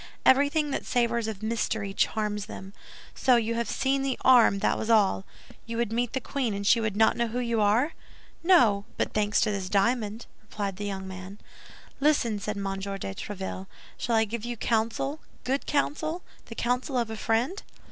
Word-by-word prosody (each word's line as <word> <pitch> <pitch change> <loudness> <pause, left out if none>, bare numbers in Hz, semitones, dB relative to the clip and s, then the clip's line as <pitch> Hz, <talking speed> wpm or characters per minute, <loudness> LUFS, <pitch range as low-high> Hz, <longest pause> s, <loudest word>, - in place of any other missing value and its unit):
Everything 285 +3 +4
that - - -2
savors 235 -2 0
of 215 -1 -5
mystery 220 -2 -1
charms 210 0 -1
them. 195 -2 -9 0.4
So 255 -1 +3
you 230 -1 +1
have 235 0 -2
seen 270 0 +1
the 270 -1 -1
arm, 245 -6 +6
that - - +1
was 220 - -4
all. 205 -3 +3 0.4
You 230 0 -4
would 235 -2 0
meet 240 0 -1
the 265 - 0
queen, 255 -4 -2
and 200 0 -4
she 230 +3 +5
would 215 -2 -2
not 220 0 +4
know 235 -1 0
who 235 +2 -3
you 235 -3 0
are?" 225 +9 +3 0.5
"No; 235 - +4
but - - -1
thanks 210 -1 +2
to 215 - +2
this 195 -2 -3
diamond," 215 +2 0 0.2
replied 205 -3 -5
the 205 0 -4
young 190 -1 -4
man. 190 +1 -8 0.6
"Listen," 275 -7 +2
said 210 +1 -4
M. 200 - -3 0.2
de 195 - -4
Tréville; 190 - -6 0.3
"shall 235 - -1
I 220 0 +4
give 220 +1 -5
you 240 0 -4
counsel, 230 +7 -1 0.2
good 270 +2 -1
counsel, 310 +4 -1 0.2
the 230 - -8
counsel 250 +3 -1
of 235 -2 -1
a - - -4
friend?" 235 - 0
225 Hz, 190 wpm, -27 LUFS, 205-250 Hz, 0.6 s, arm